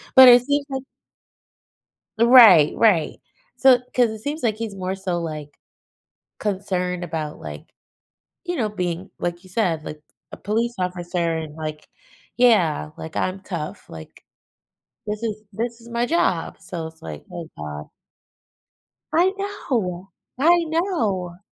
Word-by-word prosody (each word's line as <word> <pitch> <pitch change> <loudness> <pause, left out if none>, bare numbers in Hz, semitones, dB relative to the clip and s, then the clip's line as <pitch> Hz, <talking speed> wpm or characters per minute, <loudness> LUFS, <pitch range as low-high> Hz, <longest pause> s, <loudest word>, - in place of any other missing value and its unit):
But 260 -1 +11
it 245 0 +8
seems 285 +2 0
like 265 -1 -4 1.4
Right, 225 - +8
right. 195 -9 +2 0.4
So 265 -2 +6 0.2
'cause 245 -2 +3
it 220 0 -7
seems 290 +8 -4
like 220 -3 +1
he's 225 -1 -5
more 185 0 -3
so, 185 -2 -2
like, 155 -3 -7 0.8
concerned 185 -3 -2
about, 160 -3 -4
like, 75 -1 -9 0.7
you 355 0 -2
know, 225 - +1
being 180 -2 -4
like 175 +1 -3
you 185 - -16
said, 175 -6 0
like 150 0 -7 0.3
a - - -7
police 230 +4 -1
officer 175 -2 -1
and 155 -2 -6
like, 155 -1 -6 0.5
yeah, 195 -12 +3
like, 160 -1 -8
"I'm 185 +1 -1
tough," 170 -6 -6
Like, 80 -1 -12 0.8
"This 210 +2 -4
is 215 -2 -3
this 235 +3 -3
is 230 - -15
my 235 +1 0
job," 335 +7 0
so 165 -4 -6
it's 160 0 -15
like, - - -8
"Oh 170 -2 -7
god." 75 0 -6 1.3
I 355 +4 +4
know, 220 - -3 0.3
I 340 +5 +4
know. 225 - -1
190 Hz, 140 wpm, -22 LUFS, 165-235 Hz, 1.4 s, But